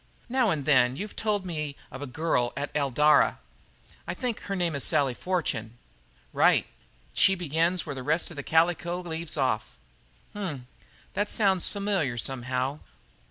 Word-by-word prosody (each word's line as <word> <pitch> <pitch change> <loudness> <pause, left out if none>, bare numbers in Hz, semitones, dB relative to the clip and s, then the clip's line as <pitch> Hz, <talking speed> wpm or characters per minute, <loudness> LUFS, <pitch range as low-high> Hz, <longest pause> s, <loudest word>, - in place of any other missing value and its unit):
"Now 250 -2 +2
and 150 -6 -1
then 130 -3 +4
you've 205 +8 -6
told 210 -3 0
me 150 -5 -3 0.2
of 135 - -8
a 145 - -4
girl 125 -3 0
at 145 +1 -3
Eldara 150 +1 +4 0.7
I - - -3
think 245 -4 -2
her 200 - -4
name 175 -3 0
is 140 - -3
Sally 140 -5 +2
Fortune?" 120 -9 -2 0.6
"Right. - - +4 0.5
She 190 - +5
begins 170 +1 0
where 145 - -4
the 130 - -6
rest 155 +6 0
of - - -9
the 145 - -4
calico 170 +3 +1
leaves 165 -2 -4
off." 125 -6 -1 0.5
"H - - -11
m! 145 -10 -4 0.5
that 205 0 0
sounds 195 -4 +3
familiar, 200 - -1
somehow. 130 +3 -1
155 Hz, 160 wpm, -27 LUFS, 135-180 Hz, 0.7 s, She